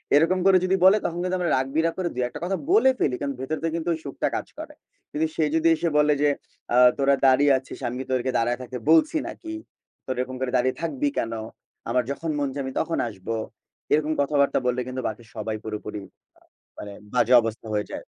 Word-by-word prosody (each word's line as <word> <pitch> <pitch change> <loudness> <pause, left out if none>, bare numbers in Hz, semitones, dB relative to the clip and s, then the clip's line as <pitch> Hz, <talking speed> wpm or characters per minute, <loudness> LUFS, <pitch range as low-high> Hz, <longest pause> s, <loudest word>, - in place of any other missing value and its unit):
এরকম 165 +5 +4
করে 195 -1 +7
যদি 185 +1 +2
বলে 190 +3 +7
তখন 170 +1 -2
কিন্তু 185 0 -1
আমরা 175 -2 0
রাগ-বিরাগ 155 +6 0
করে 185 -2 -1
২-১ 125 0 -1
টা - - -4
কথা 190 +2 -1
বলে 390 -9 +6
ফেলি। 130 - +1
কারণ 140 -1 -2
ভেতর 135 +4 -3
থেকে - - +1
কিন্তু 170 +1 -2
ওই 160 - -4
সুখটা 140 - -2
কাজ - - -3
করে। - - -8 0.4
কিন্তু 155 +2 0
সে 160 - +1
যদি 160 0 +3
এসে 170 +1 -1
বলে 150 0 +4
যে 145 - +4 0.5
"আ - - +4 0.2
তোরা 140 0 +3
দাঁড়িয়ে 135 +2 +5
আছিস, 130 - -9
আমি 125 +2 -5
তোদেরকে 130 0 0
দাঁড়ায় 120 +1 +1
থাকতে 125 0 -6
বলছি 300 - +5
নাকি? 330 -1 -7 0.5
তোরা 130 -1 -3
এরকম 130 0 -5
করে 130 -1 -1
দাঁড়িয়ে 130 +1 +1
থাকবি 145 -4 -1
কেন? 115 0 -1 0.6
আমার 125 - +2
যখন 160 +4 -4
মন 145 - 0
চায় 140 0 -3
আমি 130 - -5
তখন 165 +1 -1
আসব।" 100 -5 -11 0.7
এরকম 155 +1 +2
কথাবার্তা 140 0 +2
বললে 125 0 +1
কিন্তু 130 0 -4
বাকি 110 +2 -6
সবাই 110 0 -3
পুরোপুরি 105 -1 -5 0.4
আ - - -50 0.4
মানে 100 -1 -7 0.2
বাজে 125 - +3
অবস্থা 115 0 -5
হয়ে 105 0 0
যায়। - - -6
140 Hz, 210 wpm, -24 LUFS, 125-165 Hz, 0.7 s, করে